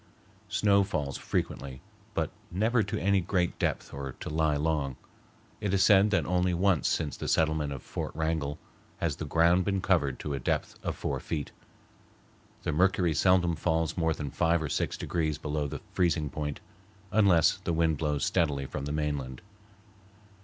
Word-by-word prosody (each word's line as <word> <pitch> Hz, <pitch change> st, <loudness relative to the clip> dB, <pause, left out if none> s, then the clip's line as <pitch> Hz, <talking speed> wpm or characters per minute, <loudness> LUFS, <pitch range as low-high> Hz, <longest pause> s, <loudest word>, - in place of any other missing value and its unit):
Snow 100 Hz, -1 st, +3 dB
falls 70 Hz, -7 st, -2 dB
frequently, 65 Hz, -2 st, -3 dB, 0.4 s
but -, -, 0 dB, 0.2 s
never 110 Hz, +6 st, +2 dB
to 100 Hz, -, -2 dB
any 100 Hz, 0 st, +3 dB
great 90 Hz, 0 st, -1 dB
depth -, -, -1 dB
or 70 Hz, -1 st, -5 dB
to -, -, -7 dB
lie 80 Hz, -1 st, +2 dB
long. 75 Hz, -3 st, 0 dB, 0.6 s
It 100 Hz, -2 st, 0 dB
is 95 Hz, -, +4 dB
said 100 Hz, +1 st, +6 dB
that 105 Hz, -, +1 dB
only 90 Hz, 0 st, +1 dB
once 95 Hz, -1 st, +2 dB
since 75 Hz, -4 st, -1 dB
the -, -, -5 dB
settlement 80 Hz, -2 st, +1 dB
of 65 Hz, -3 st, -6 dB
Fort -, -, -4 dB
Wrangell 80 Hz, -2 st, -1 dB, 0.4 s
has 80 Hz, -4 st, -1 dB
the 80 Hz, -, -5 dB
ground 85 Hz, +4 st, +4 dB
been 95 Hz, +1 st, 0 dB
covered 80 Hz, -9 st, +1 dB
to 75 Hz, -, -3 dB
a 70 Hz, -, -2 dB
depth -, -, -1 dB
of -, -, -2 dB
four -, -, -2 dB
feet. 75 Hz, -3 st, -4 dB, 1.1 s
The -, -, 0 dB
mercury 90 Hz, +1 st, +2 dB
seldom 90 Hz, +1 st, +3 dB
falls 80 Hz, -1 st, 0 dB
more 80 Hz, -3 st, +1 dB
than 70 Hz, -2 st, -5 dB
five 85 Hz, +1 st, +2 dB
or 75 Hz, -, -3 dB
six -, -, -1 dB
degrees 80 Hz, -3 st, -1 dB
below 75 Hz, -1 st, -2 dB
the -, -, -6 dB
freezing 80 Hz, -5 st, +1 dB
point, 75 Hz, -1 st, -4 dB, 0.5 s
unless 95 Hz, -7 st, +4 dB
the 95 Hz, -2 st, -3 dB
wind 80 Hz, -3 st, +1 dB
blows 75 Hz, -3 st, 0 dB
steadily 75 Hz, -6 st, +1 dB
from 70 Hz, -, -5 dB
the 70 Hz, -, -3 dB
mainland. 75 Hz, -4 st, -3 dB
80 Hz, 170 wpm, -29 LUFS, 75-90 Hz, 1.1 s, said